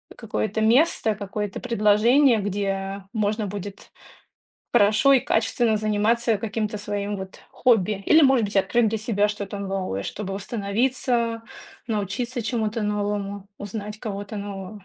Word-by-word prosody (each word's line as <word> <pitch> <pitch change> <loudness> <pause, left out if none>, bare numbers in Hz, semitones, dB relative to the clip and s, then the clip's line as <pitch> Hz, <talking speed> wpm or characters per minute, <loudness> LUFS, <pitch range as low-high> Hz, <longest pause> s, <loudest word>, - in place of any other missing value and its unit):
какое-то 105 - -2
место, 225 -1 +3
какое-то 205 0 -4
предложение, 235 +3 +4
где 195 -1 -3
можно 215 -1 0
будет 200 0 -7 0.8
хорошо 215 +7 +5
и 265 - +5
качественно 225 0 +1
заниматься 215 +2 +1
каким-то 215 0 -3
своим 205 0 -3
вот 190 -1 -9
хобби 210 -5 +2
или, 315 0 +6
может 265 -4 +5
быть, 205 0 -4
открыть 220 +4 +3
для 220 +1 -2
себя 210 -2 +1
что-то 205 -1 -5
новое, 190 - -3
чтобы 195 -2 -5
восстановиться, 230 +3 -1 0.5
научиться 225 +4 -2
чему-то 220 0 -1
новому, 205 -1 -2
узнать 210 +1 -6
кого-то 205 -1 -5
нового. 200 0 -7
210 Hz, 125 wpm, -24 LUFS, 200-230 Hz, 0.8 s, или